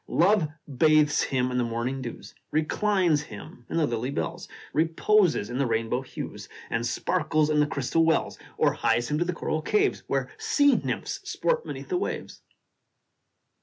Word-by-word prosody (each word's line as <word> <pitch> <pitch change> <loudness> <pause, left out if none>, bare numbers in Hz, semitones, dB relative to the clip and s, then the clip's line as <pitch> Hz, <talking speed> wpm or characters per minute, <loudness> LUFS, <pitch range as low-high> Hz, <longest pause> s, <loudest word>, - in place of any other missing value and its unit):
Love 185 -1 +3 0.3
bathes 155 -1 +5
him 125 -1 0
in 125 - 0
the - - +2
morning 120 +3 -2
dews, 120 -2 -8 0.2
Reclines 170 0 +2
him 120 -1 -11
in - - -2
the 160 - +3
lily 120 0 -2
bells, 170 +5 -4 0.3
Reposes 165 - +2
in 125 +2 -4
the 140 - +2
rainbow 115 +2 0
hues, 135 - -8 0.2
And 115 +1 0
sparkles 155 -2 +1
in 150 - +3
the 150 - +3
crystal 145 +3 +1
wells, 160 0 +1 0.2
Or - - +3
hies 120 +3 0
him 150 - +1
to 175 - +1
the 180 - 0
coral 160 -2 -2
caves, 410 - +1
Where - - -1
sea 290 -11 +4
nymphs - - -3
sport 485 -1 0
beneath - - -7
the 365 - +1
waves. 370 - -4
155 Hz, 165 wpm, -26 LUFS, 125-175 Hz, 0.3 s, bathes